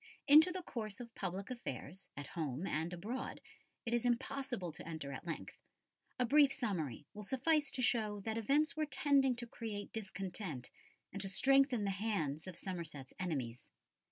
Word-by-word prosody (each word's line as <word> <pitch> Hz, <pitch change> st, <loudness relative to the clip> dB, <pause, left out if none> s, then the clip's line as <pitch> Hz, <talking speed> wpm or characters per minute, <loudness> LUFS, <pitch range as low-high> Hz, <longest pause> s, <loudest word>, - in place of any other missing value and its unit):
Into 310 Hz, +5 st, +9 dB
the 365 Hz, 0 st, -4 dB
course 215 Hz, -8 st, -4 dB
of 235 Hz, -2 st, -8 dB
public 195 Hz, +2 st, -3 dB
affairs, 185 Hz, -, -5 dB
at 145 Hz, -, -4 dB
home 155 Hz, -3 st, -3 dB
and 160 Hz, 0 st, -1 dB
abroad, 215 Hz, +9 st, -4 dB, 0.5 s
it 235 Hz, -, -1 dB
is 240 Hz, 0 st, +2 dB
impossible 245 Hz, -, 0 dB
to 155 Hz, -, -8 dB
enter 160 Hz, -4 st, -4 dB
at 165 Hz, -, -7 dB
length; 165 Hz, -, -5 dB, 0.6 s
a 250 Hz, -, +3 dB
brief 285 Hz, +2 st, +6 dB
summary 165 Hz, -, -2 dB
will 210 Hz, -, -7 dB
suffice 275 Hz, +6 st, +2 dB
to 255 Hz, -, -1 dB
show 215 Hz, -4 st, +2 dB
that 220 Hz, +2 st, -2 dB
events 280 Hz, +8 st, +3 dB
were 310 Hz, -1 st, 0 dB
tending 275 Hz, -3 st, +4 dB
to 240 Hz, 0 st, -5 dB
create 220 Hz, -3 st, -5 dB
discontent 190 Hz, -, -4 dB, 0.4 s
and 195 Hz, -, -2 dB
to 195 Hz, -, -3 dB
strengthen 270 Hz, +2 st, +4 dB
the 200 Hz, -, +1 dB
hands 190 Hz, -7 st, -1 dB
of 180 Hz, -2 st, -7 dB
Somerset's 160 Hz, -8 st, -5 dB
enemies. 135 Hz, -10 st, -3 dB
210 Hz, 165 wpm, -37 LUFS, 170-255 Hz, 0.6 s, Into